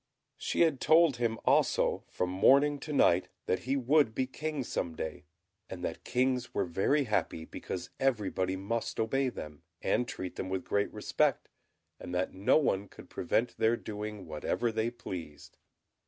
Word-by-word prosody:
She - - -1
had 160 -6 +3
told 160 -4 +5
him 115 -2 0
also, - - +2
from 90 0 -2
morning 140 +9 +5
to 155 - -7
night, 95 -10 +4 0.2
that 90 +2 -1
he 135 - +3
would 135 -3 +3
be 130 - +1
King 150 +1 -4
some 85 -8 -3
day, 80 -1 -5 0.4
and 90 -1 -7
that 80 - -5
kings 125 0 0
were 100 - +1
very 95 - +2
happy, 105 -8 -1
because - - -6
everybody 100 -7 0
must 105 +5 -3
obey 130 +4 +1
them, 75 -10 -8 0.2
and 125 - +1
treat 95 -6 -6
them 95 - -3
with 95 -1 -2
great 100 0 0
respect, - - 0 0.5
and 90 - -6
that 90 +1 -1
no 95 +8 +3
one 100 -10 +1
could - - -14
prevent 120 +2 0
their 115 +1 +3
doing 105 -2 -6
whatever 80 +9 -1
they 110 +1 0
pleased. 85 -10 -8
110 Hz, 165 wpm, -31 LUFS, 95-130 Hz, 0.5 s, told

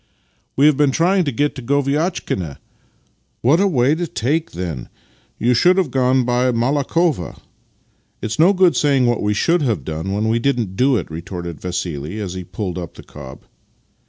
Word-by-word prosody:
" - - -43
We 140 - +5
have 150 -3 +5
been 145 -1 +3
trying 175 +6 +2
to 140 - -1
get 145 +4 0
to 130 - -8
Goviatchkina." 140 - -1 0.4
" - - -43
What 140 +8 +4
a 200 - +3
way 135 -5 +2
to 170 +2 -2
take, 150 +5 -2
then! 85 -8 -5 0.5
You 120 +2 +2
should 180 +10 +4
have 180 -8 +1
gone 130 -1 +2
by 125 +1 +1
Malakhovo." 140 - 0 0.4
" - - -42
It's 110 +7 -3
no 170 +5 +6
good 185 -3 +3
saying 140 -4 +2
what 120 -1 +1
we 105 0 0
should 170 +10 +2
have 110 - -1
done 80 +4 -4
when 105 +2 -1
we 115 +1 +1
didn't 120 -7 -1
do 130 +3 +3
it," - - -5
retorted 85 0 -7
Vassili 90 0 -4
as 95 -4 -4
he 95 0 -6
pulled 90 0 -5
up 85 -3 -8
the - - -12
cob. 65 -3 -11
125 Hz, 190 wpm, -19 LUFS, 95-145 Hz, 0.5 s, no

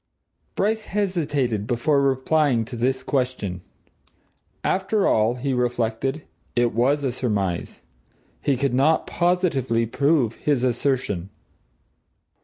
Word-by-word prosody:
Bryce 215 +2 0
hesitated 145 - -1
before 135 +4 +2
replying 135 -2 +2
to 120 - -8
this 130 +3 0
question. 125 - -2 1.0
After 195 +2 +1
all, 110 +2 +2
he 135 +2 -2
reflected, 125 +3 -1 0.3
it 120 -1 +2
was 135 +6 +2
a 135 - 0
surmise. 100 -8 -2 0.6
He 140 -3 +1
could 140 -1 0
not 140 +5 +3
positively 160 -10 +1
prove 135 -1 +1
his 140 -4 0
assertion. 120 -7 0
130 Hz, 105 wpm, -23 LUFS, 115-145 Hz, 1.0 s, not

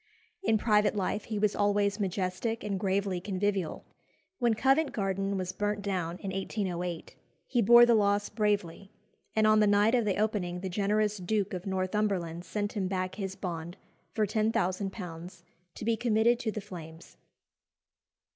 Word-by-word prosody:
In 225 - +2
private 210 -1 +2
life 200 +1 -1
he 220 - -3
was 205 0 +1
always 205 0 +1
majestic 195 +3 -2
and 200 -2 -2
gravely 195 -1 0
convivial. 195 -2 -2 0.5
When 240 -3 +2
Covent 270 +6 +2
Garden 195 -1 -1
was 185 -1 -2
burnt 205 0 -2
down 180 -4 -2
in 195 0 -5
1808, 180 -3 -3 0.3
he 245 - +1
bore 240 +3 +8
the 240 - +4
loss 205 -1 +2
bravely, 205 -3 -1 0.5
and 220 0 +3
on 215 0 +5
the 210 - +4
night 205 +3 +4
of 240 -3 +3
the 200 -3 0
opening 200 -5 -1
the 190 - -3
generous 210 +2 +1
Duke 200 +2 -1
of 185 +2 -5
Northumberland 185 -3 -1
sent 205 +4 -3
him 195 -4 -1
back 185 -1 -2
his 190 -1 -4
bond 170 -1 -5 0.3
for 215 - +1
£10,000 185 -4 -2 0.3
to - - -6
be 230 0 +2
committed 230 +1 +2
to 225 - -2
the 215 - -5
flames. 165 -4 -11
200 Hz, 155 wpm, -29 LUFS, 185-215 Hz, 0.5 s, bore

